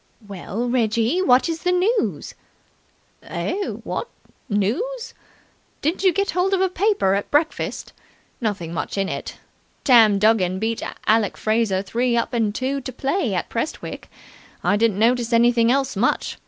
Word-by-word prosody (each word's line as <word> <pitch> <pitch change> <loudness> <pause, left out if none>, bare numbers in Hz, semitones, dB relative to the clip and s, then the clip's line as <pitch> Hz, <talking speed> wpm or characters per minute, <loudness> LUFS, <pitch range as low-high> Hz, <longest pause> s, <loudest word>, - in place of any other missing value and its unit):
"Well, 200 +4 -4
Reggie, 235 - +1
what 255 -6 +4
is 330 -1 -3
the 360 - +1
news?" 400 +6 0 0.9
"Eh? 395 +1 -3
What? 475 - -5 0.4
News? 385 - -2 0.7
Didn't 325 +7 -1
you 375 - +5
get 395 +3 0
hold 365 +3 +1
of - - -1
a 380 - +2
paper 370 - +1
at 200 +1 -2
breakfast? 310 +2 -1 0.5
Nothing 195 -7 -3
much 170 - -4
in 195 -1 0
it. - - -5 0.5
Tam 225 -6 +6
Duggan 195 -3 +2
beat 225 +3 -2 0.2
Alec 215 -2 +2
Fraser 215 -3 0
three 235 +4 0
up 235 - -1
and 220 -3 0
two 270 +2 -2
to 260 - -6
play 265 - -1
at 175 - -2
Prestwick. 230 +7 -5 0.5
I - - +3
didn't 215 -2 +2
notice 235 +2 +2
anything 235 0 +4
else 270 -2 0
much. 220 +6 0
235 Hz, 150 wpm, -22 LUFS, 210-325 Hz, 0.9 s, Tam